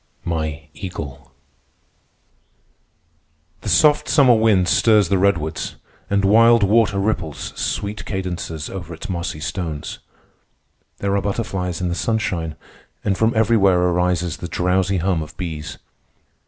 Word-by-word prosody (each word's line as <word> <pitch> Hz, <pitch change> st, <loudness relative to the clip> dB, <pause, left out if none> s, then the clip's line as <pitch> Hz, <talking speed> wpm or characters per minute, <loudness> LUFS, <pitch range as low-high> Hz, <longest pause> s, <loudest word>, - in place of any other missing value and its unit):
MY 80 Hz, -2 st, -3 dB
EAGLE 80 Hz, -9 st, -7 dB, 2.3 s
The -, -, -4 dB
soft 150 Hz, -1 st, +4 dB
summer 130 Hz, -4 st, +6 dB
wind 110 Hz, -5 st, +3 dB
stirs 105 Hz, -2 st, +4 dB
the 95 Hz, -, +2 dB
redwoods, 85 Hz, -5 st, 0 dB, 0.3 s
and 100 Hz, 0 st, +2 dB
Wild 115 Hz, +2 st, +6 dB
Water 105 Hz, 0 st, +3 dB
ripples 95 Hz, -7 st, -2 dB
sweet 100 Hz, +3 st, -3 dB
cadences 90 Hz, -5 st, -4 dB
over 85 Hz, -3 st, -7 dB
its 80 Hz, -, -9 dB
mossy 85 Hz, -4 st, -3 dB
stones. 80 Hz, -3 st, -4 dB, 1.0 s
There 100 Hz, 0 st, -1 dB
are 100 Hz, -, +1 dB
butterflies 95 Hz, -4 st, -3 dB
in 90 Hz, -, -1 dB
the -, -, -1 dB
sunshine, 90 Hz, -6 st, -1 dB, 0.5 s
and 100 Hz, -, +2 dB
from 110 Hz, +3 st, +1 dB
everywhere 105 Hz, -5 st, +4 dB
arises 90 Hz, -1 st, +1 dB
the 85 Hz, -, -6 dB
drowsy 95 Hz, +2 st, +1 dB
hum 90 Hz, -1 st, 0 dB
of 75 Hz, 0 st, -9 dB
bees. 80 Hz, -4 st, -5 dB
95 Hz, 125 wpm, -21 LUFS, 85-105 Hz, 2.3 s, summer